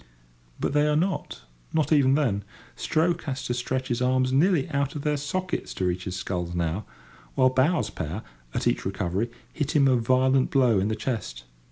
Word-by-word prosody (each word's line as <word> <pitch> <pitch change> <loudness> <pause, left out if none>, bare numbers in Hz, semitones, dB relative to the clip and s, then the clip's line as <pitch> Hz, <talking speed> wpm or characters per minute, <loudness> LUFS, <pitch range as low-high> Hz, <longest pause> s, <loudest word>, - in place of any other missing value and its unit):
But - - -1
they 150 0 +3
are 150 - +2
not—not 150 - -2
even 140 -3 +5
then. 115 -9 +1 0.3
Stroke 165 +2 0
has 135 -2 -3
to 120 - -1
stretch 130 +2 -2
his 120 0 -1
arms 130 0 +2
nearly 160 +1 +3
out 140 0 -1
of 145 - -4
their 150 -1 +1
sockets 180 +6 -3
to 95 - -1
reach 90 +1 -1
his 95 - -4
sculls 90 -2 -3
now; 85 +4 -1 0.5
while 130 0 +4
bow's 145 +7 +2
pair, 85 +8 -5 0.3
at - - -1
each - - +1
recovery, 95 +3 -1 0.2
hit 150 -1 -2
him 140 -2 +5
a 130 - +4
violent 130 +2 +3
blow 125 -7 +4
in 95 - +1
the 110 - 0
chest. 110 - -4
130 Hz, 185 wpm, -26 LUFS, 95-145 Hz, 0.5 s, even